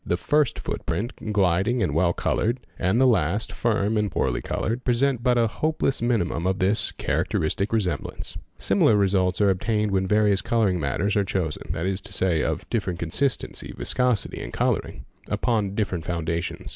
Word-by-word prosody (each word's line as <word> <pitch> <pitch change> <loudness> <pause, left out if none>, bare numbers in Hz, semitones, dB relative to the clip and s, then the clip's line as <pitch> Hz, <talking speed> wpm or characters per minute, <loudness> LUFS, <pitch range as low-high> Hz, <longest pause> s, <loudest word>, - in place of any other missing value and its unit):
The 85 - 0
first 150 +8 +1
footprint, 110 -1 -4
gliding 100 +4 +2
and 80 -6 0
well 85 +3 +3
coloured, 115 +7 0 0.2
ind 95 +6 +2
the 130 - +5
last, 105 -4 +2
firm 110 -2 0
and 105 -1 +1
poorly - - 0
coloured, 115 +3 -2
present 125 0 +1
but 125 0 +2
a 115 - +4
hopeless 140 +3 -1
minimum 105 -8 0
yf 95 0 +1
this 100 +3 +1
" - - -24
characteristic 95 +6 -1
resemblance." 105 -6 -2
_ - - -8 0.2
Similar 105 - +3
results 95 -1 +2
are 100 -1 +5
obtained 105 +2 0
when 95 -1 +1
various 105 -1 +3
colouring 105 -6 +1
matters 90 - 0
are 100 - +3
chosen 90 -5 -3
that 80 - -3
is 95 0 -1
to - - -9
say 90 -4 +1
of 80 +4 -2
different 100 -7 -1
consistency, 115 - -2
viscosity, 125 -4 0
and - - -6
colouring) - - -1 0.2
upon 105 -5 0
lifferent 95 -6 -1
foundations. 85 0 -3
100 Hz, 170 wpm, -24 LUFS, 90-115 Hz, 0.2 s, the